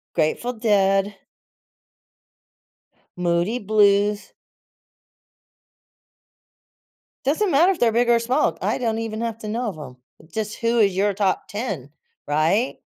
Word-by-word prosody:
Grateful 175 +10 0
Dead. 200 -3 +1 2.0
Moody 175 +7 0
Blues. 205 0 +2 2.9
Doesn't 335 +8 +1
matter 335 +7 +5
if 375 - -4
they're 230 -2 +3
big, 240 +1 +2
or 235 - +5
small. 250 +5 0
I - - 0
don't 225 -3 -1
even 225 -1 -4
have 230 -1 -3
to 215 - -7
know 235 +2 -2
of 195 - -5
'em. 125 -3 -10 0.3
Just, 215 +4 -4
who 230 0 +1
is 200 -3 +4
your 200 +2 +1
top 195 -1 -1
10, 200 - -5 0.4
right? 160 - +1
215 Hz, 120 wpm, -22 LUFS, 195-235 Hz, 2.9 s, matter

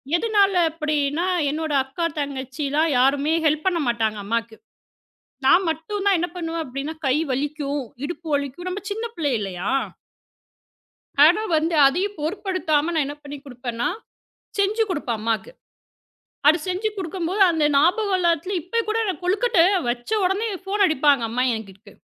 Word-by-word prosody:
எதனால 400 0 +3 0.2
அப்படின்னா, 305 0 -1 0.3
என்னோட 310 0 -3
அக்கா, 270 +6 -4
தங்கச்சிலாம் 280 +3 -1
யாருமே 280 +4 +3
ஹெல்ப் 305 +1 +1
பண்ண 355 -3 +2
மாட்டாங்க, 220 -2 0
அம்மாக்கு. 230 +1 -2 0.9
நான் 350 +8 +6
மட்டும் 330 +6 -3
தான் 395 -2 +4
என்ன 350 - 0
பண்ணுவேன்? 330 -2 -3
அப்படின்னா, 275 +4 -4
கை 260 - +3 0.2
வலிக்கும், 285 +1 -2 0.2
இடுப்பு 340 +1 -7
வலிக்கும். 280 +5 -4
நம்ம 370 +2 -4
சின்ன 445 +3 -3
பிள்ளை 290 -4 -1
இல்லையா? 185 -3 -4 1.6
ஆனா, 350 +7 +5 0.2
வந்து 325 +2 0
அதையும் 375 +8 -1
பொருட்படுத்தாம 325 -2 0
நான் 315 -2 +2
என்ன 290 - -6
பண்ணிக் 285 -1 -9
கொடுப்பேன்னா, 245 -2 -3 0.7
செஞ்சு 405 +3 +2
கொடுப்பேன் 265 -9 -2
அம்மாக்கு. 225 - -2 1.0
அது 315 +3 +5
செஞ்சு 370 +4 0
கொடுக்கும் 355 -2 -3
போது 390 +4 -2
அந்த 320 -3 +1
ஞாபகம் 375 +7 +3
எல்லாத்துலயும் 345 +2 +1
இப்ப 465 +6 0
கூட 435 +1 +1
நான் 370 -1 -3
கொழுக்கட்டை 400 0 +3 0.3
வச்ச 240 0 -3
உடனே 390 +5 0 0.2
போன் 405 +1 +2
அடிப்பாங்க 290 -5 +3
அம்மா 240 +3 -1
எனக்கு. 200 -3 -10
315 Hz, 140 wpm, -23 LUFS, 275-365 Hz, 1.6 s, நான்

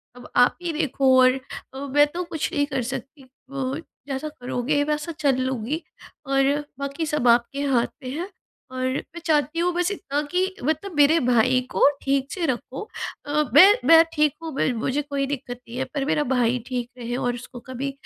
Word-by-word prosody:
अब 245 - -12
आप 245 - +4
ही 345 -1 -2
देखो 270 -4 +2
और 255 +1 +4 0.5
मैं 290 +1 +6
तो 355 +1 -2
कुछ 325 -3 -3
नहीं 285 - +2
कर 285 -3 -2
सकती 270 +2 -7 0.3
उ 270 0 -2 0.3
जैसा 275 +2 -3
करोगे 280 0 -1
वैसा 300 +3 -2
चल 280 -3 +3
लूँगी 260 +4 -2 0.5
और 275 0 +3 0.3
बाकी 280 +3 -3
सब 300 -5 0
आपके 240 +4 +3
हाथ 260 -4 +2 0.2
में 255 - -5
है। 355 +4 -4 0.4
और 255 0 -3
मैं 285 +6 -4
चाहती 305 +1 +1
हूँ 355 +1 +2
बस 355 +2 0
इतना 295 -8 -2
कि 375 +1 0
मतलब 315 +8 -1
मेरे 295 +3 +5
भाई 255 +2 +4
को - - +5
ठीक 275 0 0
से 355 -3 -2
रखो 260 - -3 0.4
अ, 295 +1 +1
मैं 305 +7 +10 0.2
मैं 330 0 +9
ठीक 300 -2 +2
हूँ 325 - -4 0.3
मुझे 260 +5 -1
कोई 280 -1 -2
दिक्कत 250 -3 -5
नहीं 235 +1 -8
है 260 - 0
पर 280 -2 -1
मेरा 300 +1 +1
भाई 245 0 +2
ठीक 245 -2 -3
रहे 240 0 -4
और 245 -1 -1
उसको 245 0 -9
कभी 265 +2 -3
275 Hz, 185 wpm, -24 LUFS, 255-305 Hz, 0.5 s, मैं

